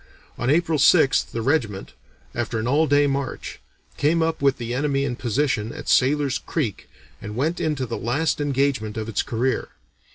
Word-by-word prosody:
On 120 - -2
April 160 0 +2
6th 145 -1 +4
the 115 - -4
regiment, 115 -8 -1 0.4
after 120 -1 -2
an 110 +1 -2
all 150 +5 +3
day 145 0 +4
march, 140 -1 -3 0.4
came 160 +3 +2
up 160 -2 -1
with 140 -1 +3
the 120 -1 -4
enemy 140 +1 0
in 125 -3 -2
position 120 -2 -1
at - - -9
Sailor's 140 +1 +2
Creek, 130 - -3 0.3
and 105 0 -7
went 155 +8 -1
into 150 -4 -1
the 115 - -4
last 145 +6 0
engagement 135 -6 0
of 110 0 -3
its 115 - 0
career. 125 +3 -1
135 Hz, 170 wpm, -23 LUFS, 120-150 Hz, 0.4 s, 6th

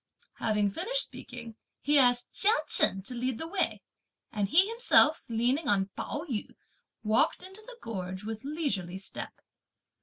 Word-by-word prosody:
Having 210 -2 0
finished 475 - +2
speaking, 230 -2 -10 0.2
he 295 0 +3
asked 245 -2 +2
Chia 415 - +3 0.2
Chen 190 0 +5
to 250 - -6
lead 250 0 -3
the 320 - -6
way; 380 +3 -1 0.5
and 205 -3 -2
he 365 - +5
himself, 455 -8 +5
leaning 245 +6 0
on 195 -2 +1
Pao 295 +3 -5
yü, 230 -7 -5 0.5
walked 215 +10 +1
into 380 +3 -9
the 480 +2 -13
gorge 185 -3 -6
with 220 0 -7
leisurely 240 - -3
step. 190 - -8
245 Hz, 150 wpm, -28 LUFS, 210-320 Hz, 0.5 s, Chen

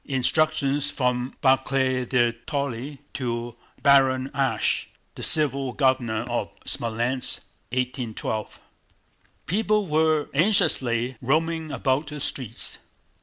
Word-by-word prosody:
(Instructions 140 +1 +1
from 125 -2 -1
Barclay 130 -1 +2
de 120 -1 +2 0.2
Tolly 140 -1 -3
to 120 -2 -3 0.3
Baron 135 -2 +4
Asch, 135 -1 +1 0.3
the - - -9
civil 140 -4 +2
governor 125 -5 +1
of 120 -1 -2 0.2
Smolénsk, 120 +3 -1 0.3
1812.) 125 -3 -3 0.9
People 210 +2 +1
were 155 -2 +2
anxiously 130 - +2
roaming 160 +4 0
about 135 +3 0
the 150 0 -6
streets. 125 -4 -1
130 Hz, 95 wpm, -25 LUFS, 125-145 Hz, 0.9 s, Baron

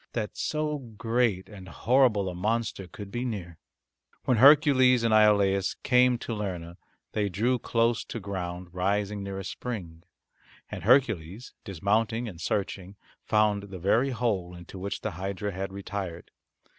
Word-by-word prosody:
That 110 -3 -3
so 150 -1 -2
great 115 -4 -1
and 95 -4 -11
horrible 115 - +2
a 90 - -3
monster 105 +1 -2
could 100 +1 -10
be 120 +3 -3
near! 95 -9 -5 0.7
When 125 - +3
Hercules 130 -2 +6
and 115 -1 +2
Iolaus 100 -3 +4
came 125 -1 +4
to 120 - -5
Lerna 90 -5 -5 0.3
they 105 -1 0
drew 120 +7 +1
close 115 0 +1
to 115 - -6
ground 90 -3 -5
rising 100 +2 -1
near 100 0 -5
a 95 - -5
spring, 90 -11 -6 0.7
and - - -6
Hercules 110 - +2
dismounting 110 +4 0
and 90 -6 -9
searching 95 +1 -3 0.3
found 105 -2 +1
the 95 - -7
very 110 +9 +2
hole 105 -8 -1
into 85 +2 -10
which 100 +2 -4
the 110 - -3
hydra 95 +3 -4
had 95 +1 -4
retired. 95 -3 -6
105 Hz, 145 wpm, -27 LUFS, 95-115 Hz, 0.7 s, Hercules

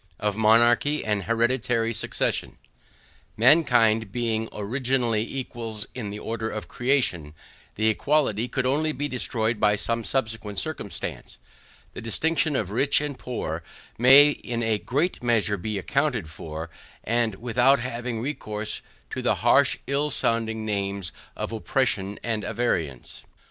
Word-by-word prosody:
OF 105 -1 -1
MONARCHY 120 +7 +4
AND 105 -3 -1
HEREDITARY 115 0 +1
SUCCESSION 110 - -2 0.8
MANKIND 115 -5 +4
being 115 -2 -1
originally 120 +1 0
equals 115 -3 -4
in 115 -5 -5
the 105 - -6
order 110 +1 -3
of 110 - -5
creation, 120 - 0 0.4
the 110 +1 +1
equality 125 -2 +1
could 130 0 -2
only 150 +4 +1
be 145 +2 -2
destroyed 115 -4 -1
by 105 -1 +4
some 115 +2 -2
subsequent 110 -5 -3
circumstance; - - -5 0.6
the - - -7
distinctions 150 +6 0
of 100 -6 -1
rich, 135 +6 +3
and 145 -3 -4
poor, 85 -10 -4 0.4
may 135 +4 +8
in 120 -4 -4
a 110 -2 +1
great 150 - -1
measure 115 -4 +2
be 105 +2 -4
accounted 120 - -1
for, 80 +1 -7 0.3
and 115 -1 +1
that - - -12
without 125 +3 +3
having 120 -2 -4
recourse 110 -6 -3 0.3
to - - -3
the - - +2
harsh - - +5
ill 140 +2 0
sounding 110 -4 0
names 100 -3 -2 0.2
of - - -4
oppression 110 -3 -1
and 110 -2 -1
avarice. 80 - -2
115 Hz, 135 wpm, -25 LUFS, 105-130 Hz, 0.8 s, may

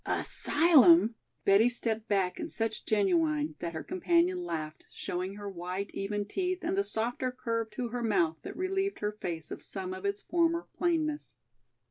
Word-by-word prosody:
"Asylum!" 325 -4 +5 0.3
Betty 200 +5 +6
stepped 225 -2 -2
back 195 -3 +1
in - - -4
such 225 -1 -3
genuine 165 -7 +2
that 170 -1 -4
her 160 - -4
companion 355 0 +1
laughed, 155 - -5
showing 185 +2 -4
her 205 0 -7
white, 185 +1 -4
even 205 +1 -2
teeth 365 - -2
and 345 +3 0
the 400 - +2
softer 245 - -2
curve 230 -3 -2
to 235 +3 -4
her 245 +1 -3
mouth 170 -8 +2
that - - -8
relieved 385 +2 -1
her 210 0 0
face 170 -7 -5
of - - -6
some 185 -2 -5
of 185 +1 -8
its 200 0 -2
former 335 0 +1
plainness. 315 -4 -1
220 Hz, 165 wpm, -30 LUFS, -, 0.3 s, Betty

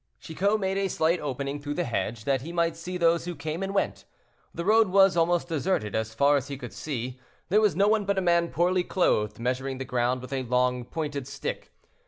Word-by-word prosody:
Chicot 200 +7 0
made 195 0 -1
a 195 - +1
slight 170 -1 +1
opening 140 0 -3
through 145 0 -4
the 175 - 0
hedge, 115 -3 -3
that 135 +1 +1
he 160 +6 -7
might 170 -1 +1
see 180 +2 -5
those 170 -1 +2
who 175 -1 -4
came 160 +2 -4
and 195 0 -2
went. 195 - -1 0.5
The 170 - -5
road 220 +1 +5
was 195 0 +5
almost 170 +1 +2
deserted 160 - -1
as 110 0 -2
far 140 +4 +4
as 135 - -3
he 140 - -5
could 125 -2 -8
see; 130 -3 -5 0.3
there 210 +4 +4
was 210 -7 +3
no 200 +3 +3
one 215 -1 +2
but 200 0 0
a - - +4
man 170 -1 +3
poorly 180 +1 +1
clothed 140 - +1
measuring 130 +2 -2
the 135 - -5
ground 125 0 0
with 130 - -7
a 135 - -1
long, 125 0 0
pointed 145 -1 -4
stick. 475 - -5
160 Hz, 225 wpm, -27 LUFS, 130-180 Hz, 0.5 s, road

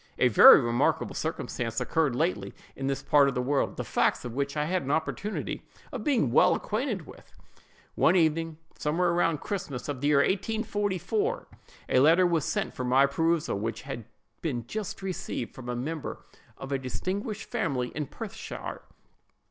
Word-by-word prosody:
A 125 - +4
very 110 - +10
remarkable 120 0 +1
circumstance 115 -1 -3
occurred 155 -6 +1
lately 120 - -1 0.2
in 135 - -3
this 135 0 -2
part 145 -2 +5
of 135 - -5
the 125 - 0
world, 140 +2 0
the - - -2
facts - - +1
of 120 - -5
which 140 +3 -2
I 150 - +1
had 180 +3 0
an 135 - -6
opportunity 160 +7 -2 0.3
of - - -5
being 250 - +2
well - - +5
acquainted 215 - -2
with. - - -14 0.6
One 175 - +3
evening, 165 -1 +1 0.2
somewhere 170 +3 +1
about 165 -3 +1
Christmas, 160 - -4
of 140 -3 -4
the 145 - +1
year 150 -1 +4
1844, 210 - 0 0.4
a 130 - +4
letter 165 +7 +6
was 165 -5 +1
sent - - -2
for 130 - -4
my 130 +2 +4
perusal, 160 -4 0
which 115 +4 -4
had 125 -5 -6 0.4
been 125 -8 -2
just 200 - -5
received 185 -10 -4
from 125 -2 -9
a 125 - -2
member 150 +5 -5 0.3
of 135 - -8
a 135 - 0
distinguished 195 - -4
family, 125 -2 -1
in 150 -2 -4
Perthshire. 215 - -7
150 Hz, 170 wpm, -28 LUFS, 130-185 Hz, 0.6 s, very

